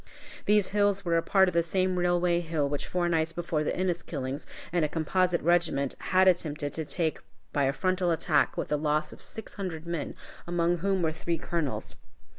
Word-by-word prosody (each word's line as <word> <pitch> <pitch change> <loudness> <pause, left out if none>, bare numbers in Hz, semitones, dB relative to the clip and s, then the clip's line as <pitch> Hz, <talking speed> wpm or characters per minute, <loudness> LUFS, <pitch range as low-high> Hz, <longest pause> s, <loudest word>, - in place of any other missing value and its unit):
These 210 -2 +4
hills 205 -1 +2
were 170 -1 +2
a 165 - +4
part 190 +2 +4
of 180 - -1
the 170 - +4
same 185 +2 0
Railway 175 -1 +2
Hill 160 -4 -1
which 145 0 -3
four 175 -1 0
nights 165 -1 +1
before 165 -2 -1
the - - 0
Inniskillings 155 -6 -3 0.3
and 175 -2 +2
a 150 - +1
composite 175 +3 +1
regiment 165 -5 +2
had 185 0 +3
attempted 150 -5 +1
to 160 - -4
take 160 0 -1 0.3
by 140 -2 +2
a 135 - +3
frontal 185 +3 0
attack 160 -3 +2
with - - -2
the 150 - +1
loss 150 0 0
of - - -14
six 220 - -8
hundred 175 -5 -5
men, 170 -3 -3 0.3
among 175 0 +1
whom 190 0 +1
were 160 - +2
three 165 +1 -2
colonels. 165 -6 -3
170 Hz, 195 wpm, -28 LUFS, 155-180 Hz, 0.3 s, These